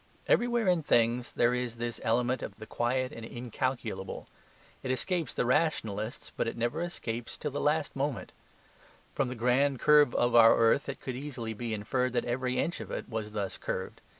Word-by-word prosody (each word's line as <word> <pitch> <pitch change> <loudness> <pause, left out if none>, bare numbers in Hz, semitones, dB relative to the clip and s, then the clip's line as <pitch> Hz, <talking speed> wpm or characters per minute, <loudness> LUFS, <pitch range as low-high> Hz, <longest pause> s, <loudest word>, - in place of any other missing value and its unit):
Everywhere 240 -3 +2
in 180 -3 +3
things 120 -3 +2
there 120 +1 +3
is 125 -2 -2
this 120 0 -4
element 125 +3 +1
of 100 - -6
the 110 - -9
quiet 125 +3 -1
and 115 - -9
incalculable. 120 -4 -4 0.5
It 130 - -5
escapes 160 +2 -1
the - - -1
rationalists, 120 -6 0
but - - -1
it 115 - -3
never 120 +7 -1
escapes 120 -9 -4
till 150 - -3
the 145 - -3
last 150 0 +1
moment. 140 -1 -2 0.8
From - - 0
the 125 - -4
grand 125 +3 +2
curve 150 -2 +5
of 120 0 +2
our 115 -1 +8
earth 115 +5 +3
it 140 - -6
could 130 - -4
easily 125 -5 -5
be 115 +1 -4
inferred 125 +4 -1
that 120 - 0
every 125 +1 -1
inch 170 - -1
of - - -7
it - - -5
was 110 -2 -4
thus 100 -3 -3
curved. - - -4
125 Hz, 185 wpm, -30 LUFS, 115-140 Hz, 0.8 s, our